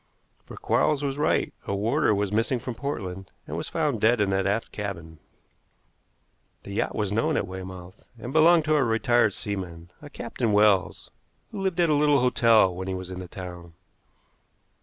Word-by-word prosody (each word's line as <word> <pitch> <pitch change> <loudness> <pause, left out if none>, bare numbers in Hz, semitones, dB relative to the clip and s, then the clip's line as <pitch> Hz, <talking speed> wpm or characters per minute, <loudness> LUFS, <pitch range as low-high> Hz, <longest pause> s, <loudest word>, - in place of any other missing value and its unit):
For - - -10
Quarles 150 -2 +1
was 140 0 -2
right, 150 - +1
a 100 - -1
warder 110 +2 +1
was 100 -1 -1
missing 115 +4 +1
from 120 +1 -5
Portland, 95 -9 -5 0.2
and - - -6
was - - -4
found 150 -9 -1
dead 115 +1 +4
in 100 -2 +1
that 95 0 +1
aft 105 +3 -1
cabin. 85 -6 -6 1.4
The - - -9
yacht 100 - -2
was 105 -2 -1
known 110 +2 +1
at - - 0
Weymouth, 95 0 -9
and 120 +4 -7
belonged 160 0 +5
to 155 0 +2
a 145 - +3
retired 115 -2 +2
seaman, 90 -4 -6
a 145 - -10
Captain 115 -5 -3
Wells, 105 -3 +2 0.4
who 195 - -5
lived 190 -2 -1
at 170 -2 +3
a - - +4
little 145 -1 +3
hotel 115 -6 +4
when 95 +1 -6
he 95 - -2
was 95 0 -7
in 90 - -6
the 90 - -7
town. 90 -2 -9
105 Hz, 180 wpm, -25 LUFS, 95-135 Hz, 1.4 s, belonged